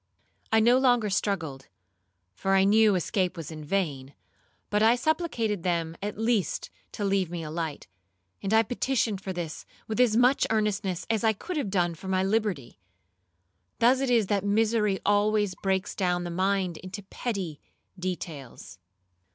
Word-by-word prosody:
I 220 - +5
no 240 +3 +5
longer 245 -5 +3
struggled, 165 -10 -2 0.7
for 195 - 0
I 190 - +5
knew 210 +1 +5
escape 185 0 -1
was 165 -1 -6
in 155 -1 -8
vain, 145 -6 -2 0.6
but 210 0 +2
I 225 +2 +6
supplicated 245 - -1
them 165 -2 -1
at 205 0 -4
least 225 -6 0 0.2
to 205 - -3
leave 195 -3 +1
me 170 -1 -5
a 155 - -6
light; 160 -3 -4 0.6
and 195 - -3
I 220 0 +5
petitioned 235 -3 -1
for 190 - -4
this 175 -3 -5 0.2
with 220 +2 -3
as 235 -3 +4
much 250 +3 +4
earnestness 210 -4 -1
as 225 -1 0
I 220 -1 +4
could 360 - -6
have 275 -9 -1
done 175 -3 +1
for 165 +4 -10
my 190 0 +1
liberty. 195 - -1 1.0
Thus 250 +3 +4
it 270 -1 0
is 235 -4 +4
that 200 0 0
misery 210 -1 +2
always 205 -1 +2
breaks 190 +1 -1
down 180 -2 0
the 175 - -4
mind 185 -1 0
into 190 +2 -8
petty 190 -7 -4 0.4
details. 155 - -6
195 Hz, 160 wpm, -27 LUFS, 175-220 Hz, 1.0 s, I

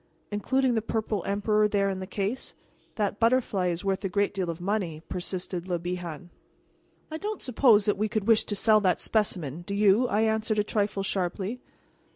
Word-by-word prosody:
"Including 260 +5 +1
the 220 - +1
purple 220 -3 -2
emperor 210 +1 +2
there 200 -1 +1
in 190 -1 -2
the 185 - -6
case? 205 +6 -3 0.4
That 205 -1 -1
butterfly 230 -6 +2
is 175 +2 -2
worth 195 +1 0
a 195 - -1
great 200 +3 +1
deal 190 -3 -2
of 165 0 -4
money," 175 -5 -2
persisted 180 0 -4
Le 180 -2 0
Bihan. 175 -1 -5 0.8
"You 315 - -4
don't 420 +1 -4
suppose 235 -5 +4
that 205 -1 +1
we 215 0 +1
would 215 -3 -1
wish 225 -2 +5
to 205 - -2
sell 215 +1 +4
that 185 -3 +2
specimen, 175 - -1
do 200 +3 -5
you?" 210 +4 +4
I 210 -1 +1
answered 220 0 +1
a 210 - +3
trifle 205 -1 -1
sharply. 195 +4 -2
205 Hz, 190 wpm, -27 LUFS, 185-220 Hz, 0.8 s, wish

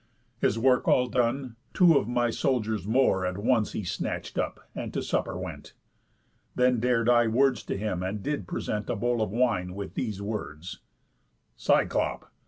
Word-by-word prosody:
His 110 - +1
work 125 +2 +3
all 125 - +4
done, 125 0 -1 0.2
two 175 -3 +6
of 110 - +2
my 120 -1 +1
soldiers 110 -6 -1
more 110 -5 +3
At 90 0 -2
once 110 +1 +1
he 105 - -3
snatch'd 90 - -3
up, - - -4
and - - -5
to - - -1
supper - - -1
went. - - -7 0.8
Then 125 -1 +3
dar'd 120 -1 +1
I 120 -1 +5
words 125 +1 +2
to - - -3
him, 95 -3 -2
and 95 +2 -3
did 145 -11 -3
present 105 +4 -3
A - - 0
bowl 120 +2 0
of 110 - 0
wine, 105 -5 0
with 100 0 -6
these 110 -6 -3
words: 100 -5 -5 0.8
'Cyclop! - - 0
115 Hz, 170 wpm, -27 LUFS, 100-125 Hz, 0.8 s, two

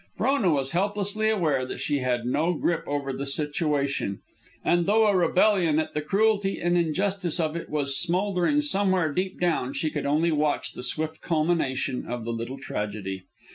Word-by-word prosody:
Frona 230 -2 +2
was 135 -4 +1
helplessly 205 +3 0
aware 160 -11 +1
that 130 - -6
she 145 - 0
had 125 -2 -1
no 160 +8 +1
grip 165 +2 0
over 140 -1 -2
the 140 +1 -4
situation, 140 - -1 0.5
and, 175 -1 +2
though 220 +2 +4
a 205 -2 +3
rebellion 180 -2 +3
at 160 - -1
the 150 - -1
cruelty 200 +4 +1
and 175 +1 +1
injustice 175 +1 +1
of 160 -1 0
it 170 - -5
was 140 -2 0
smouldering 180 +8 +1
somewhere 190 - +1
deep 185 +2 -2
down, 160 -7 0
she 155 - -1
could - - -3
only 155 +4 +2
watch 150 -1 0
the - - -7
swift 155 +5 -2
culmination 155 -6 0
of 120 -1 -4
the 115 - -2
little 115 +4 -5
tragedy. 100 -6 -5
160 Hz, 175 wpm, -26 LUFS, 140-185 Hz, 0.5 s, though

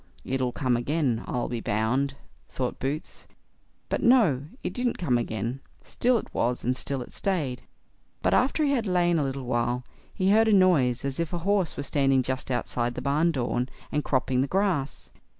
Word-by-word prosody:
"It'll 130 -1 -1
come 125 -1 0
again, 125 -1 0
I'll 120 - -1
be 120 - -3
bound", 120 +7 0 0.3
thought 125 -2 -3
Boots; 140 +4 -4 0.6
but - - -1
no, 205 - +4 0.2
it - - -3
didn't 245 -1 -1
come 135 -9 +1
again; 115 +3 -3 0.2
still 245 0 +1
it - - -7
was, 120 +1 0
and 125 +2 +1
still 135 0 -3
it - - -16
stayed; 150 -10 -1 0.6
but - - +3
after 275 +4 +2
he 280 - +2
had 240 -6 0
lain 175 -2 +2
a - - +1
little 135 -1 -3
while, 120 0 0 0.3
he 190 -1 +1
heard 220 +2 +5
a 220 - +4
noise 140 -11 +4
as 135 +1 -3
if 170 0 -2
a - - 0
horse 200 -5 +1
were 140 - -2
standing 135 -2 +2
just 130 +1 -3
outside 120 -1 -1
the - - -4
barn 150 +5 +2
door, 125 -3 -1 0.2
and 150 0 0
cropping 130 -1 +1
the 135 - 0
grass. 180 -6 -1
135 Hz, 185 wpm, -27 LUFS, 125-180 Hz, 0.6 s, heard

